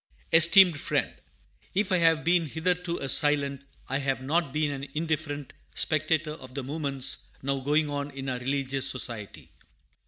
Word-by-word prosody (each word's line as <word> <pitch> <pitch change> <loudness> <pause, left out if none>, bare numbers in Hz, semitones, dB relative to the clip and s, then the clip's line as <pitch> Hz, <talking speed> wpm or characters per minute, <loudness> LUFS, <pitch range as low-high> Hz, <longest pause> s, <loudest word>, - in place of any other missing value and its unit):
ESTEEMED 170 0 +7
FRIEND, - - -1 0.6
If 200 +1 0
I 185 - +4
have 165 -2 +3
been 170 -1 +2
hitherto 175 +3 -2
a - - -4
silent, 140 -1 +2 0.2
I 135 +1 -1
have 135 -2 -1
not 155 +1 0
been 150 0 -1
an 140 0 -6
indifferent, 150 -3 -3 0.2
spectator 155 0 0
of 130 -4 -13
the 140 - -3
movements 135 -2 -3 0.2
now 140 0 -1
going 150 +3 +1
on 145 0 -4
in 135 -1 -8
our 125 -1 -2
religious 135 +1 -1
Society. 115 -5 -3
145 Hz, 155 wpm, -27 LUFS, 135-160 Hz, 0.6 s, ESTEEMED